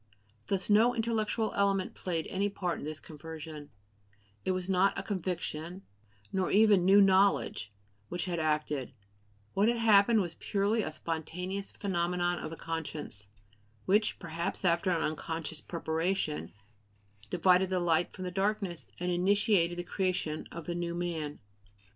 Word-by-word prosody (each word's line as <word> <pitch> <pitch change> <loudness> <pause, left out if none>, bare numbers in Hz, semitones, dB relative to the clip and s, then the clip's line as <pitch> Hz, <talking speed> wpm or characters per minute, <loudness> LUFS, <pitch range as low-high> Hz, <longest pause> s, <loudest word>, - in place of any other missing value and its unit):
Thus 195 -2 0
no 225 +4 +5
intellectual 225 -1 0
element 195 -2 +1
played 165 -3 -3
any 200 +2 -1
part 180 -3 -2
in - - -6
this 155 0 -4
conversion; 155 -1 -9 0.7
it - - -2
was 185 -1 0
not 190 +1 +3
a - - -3
"conviction," 180 -2 -4 0.5
nor 190 -1 +1
even 205 -3 +5
new 195 +2 +7
"knowledge," 190 - +3 0.4
which 175 - -3
had 175 -2 -2
acted; 150 -4 -1 0.6
what 200 +2 +3
had 235 0 +2
happened 220 0 +5
was 175 -3 -3
purely 205 +3 +1
a 155 - -3
spontaneous 180 +5 -4
phenomenon 175 -2 0
of - - -5
the 165 - -7
conscience, 155 -10 -4 0.6
which, 210 +3 +2
perhaps 170 +4 -4
after 170 +2 +3
an 170 -3 +1
unconscious 160 0 -3
preparation, 165 -1 -2 0.8
divided 185 - +4
the 185 -1 +1
light 170 -1 +2
from 185 - -8
the 180 - -3
darkness 195 -2 -1
and 180 0 -1
initiated 180 -1 +3
the 175 - -2
creation 180 -4 -2
of 170 -2 -7
the 175 - -2
new 170 0 -3
man. 165 -4 -3
180 Hz, 145 wpm, -31 LUFS, 165-195 Hz, 0.8 s, new